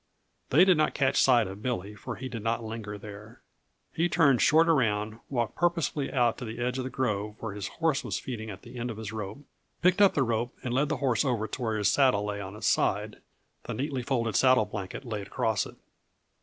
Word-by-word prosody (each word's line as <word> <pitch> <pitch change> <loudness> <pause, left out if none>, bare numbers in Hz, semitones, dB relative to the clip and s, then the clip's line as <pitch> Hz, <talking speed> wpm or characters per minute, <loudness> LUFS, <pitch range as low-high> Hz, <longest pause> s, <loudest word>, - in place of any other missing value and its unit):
They 165 +8 +6
did 185 -4 +5
not 155 - +1
catch 135 -1 +3
sight 120 -4 +5
of 95 +2 -8
Billy 105 -4 -3
for 115 +3 -7
he 130 - -6
did 115 -3 -6
not 115 +1 -1
linger 110 -2 -6
there. 105 +2 -11 0.5
He 170 +2 +1
turned 140 -9 +4
short 160 +2 +5
around, 110 -7 +1
walked 120 -5 -1
purposefully 170 -5 0
out 120 -4 +2
to 125 - -5
the 110 0 -6
edge 125 +2 -1
of - - -1
the 130 - -4
grove 105 -5 -2
where 110 -3 -5
his 100 -1 -4
horse 160 -4 0
was - - -2
feeding 110 -4 -6
at 100 -1 -9
the 125 - -9
end 120 +1 -3
of 110 - -6
his 110 -2 -6
rope, 110 +5 -6 0.4
picked 180 +3 +4
up 200 - +6
the 140 - +3
rope 120 0 -1
and 120 - -2
led 140 +3 +2
the 155 - 0
horse 130 -1 +1
over 120 -6 0
to 120 - -6
where 110 -2 0
his 105 - +1
saddle 130 -8 +3
lay 105 -1 -3
on 95 +1 -7
its 105 - -6
side, - - +1 0.5
the - - -4
neatly 135 -1 -2
folded 120 -3 -1
saddle 130 -4 +5
blanket 105 +4 -6
laid 105 -4 -4
across 110 -1 0
it. - - -13
120 Hz, 225 wpm, -28 LUFS, 105-135 Hz, 0.5 s, They